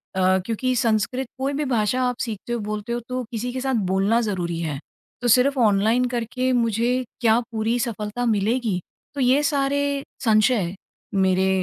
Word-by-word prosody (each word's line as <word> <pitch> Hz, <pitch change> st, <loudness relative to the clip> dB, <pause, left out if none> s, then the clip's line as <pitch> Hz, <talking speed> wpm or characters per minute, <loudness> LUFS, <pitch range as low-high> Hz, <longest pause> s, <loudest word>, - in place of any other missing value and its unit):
अ, 190 Hz, 0 st, +3 dB
क्योंकि 255 Hz, +3 st, -1 dB
संस्कृत 240 Hz, +2 st, 0 dB
कोई 270 Hz, +2 st, -1 dB
भी 295 Hz, +1 st, -1 dB
भाषा 245 Hz, -1 st, +1 dB
आप 250 Hz, -, -4 dB
सीखते 230 Hz, 0 st, -4 dB
हो, 240 Hz, -, -1 dB
बोलते 215 Hz, +2 st, -4 dB
हो 240 Hz, -, -1 dB
तो 255 Hz, 0 st, -2 dB
किसी 240 Hz, +2 st, -3 dB
के 255 Hz, -, -3 dB
साथ 265 Hz, -1 st, 0 dB, 0.2 s
बोलना 205 Hz, +5 st, +2 dB
ज़रूरी 175 Hz, -6 st, -2 dB
है। 150 Hz, -4 st, -3 dB, 0.4 s
तो 245 Hz, -, 0 dB
सिर्फ़ 260 Hz, +4 st, +4 dB
ऑनलाइन 220 Hz, +3 st, +3 dB
करके 250 Hz, +2 st, -1 dB
मुझे 235 Hz, +2 st, +1 dB, 0.2 s
क्या 225 Hz, -1 st, +4 dB
पूरी 225 Hz, +1 st, 0 dB
सफलता 220 Hz, +1 st, -3 dB
मिलेगी? 220 Hz, -2 st, +1 dB, 0.4 s
तो 280 Hz, -, -2 dB
ये 260 Hz, +4 st, +4 dB
सारे 285 Hz, -1 st, 0 dB, 0.2 s
संशय 215 Hz, -4 st, +3 dB, 0.4 s
मेरे 190 Hz, -1 st, +2 dB
235 Hz, 165 wpm, -23 LUFS, 210-255 Hz, 0.4 s, सिर्फ़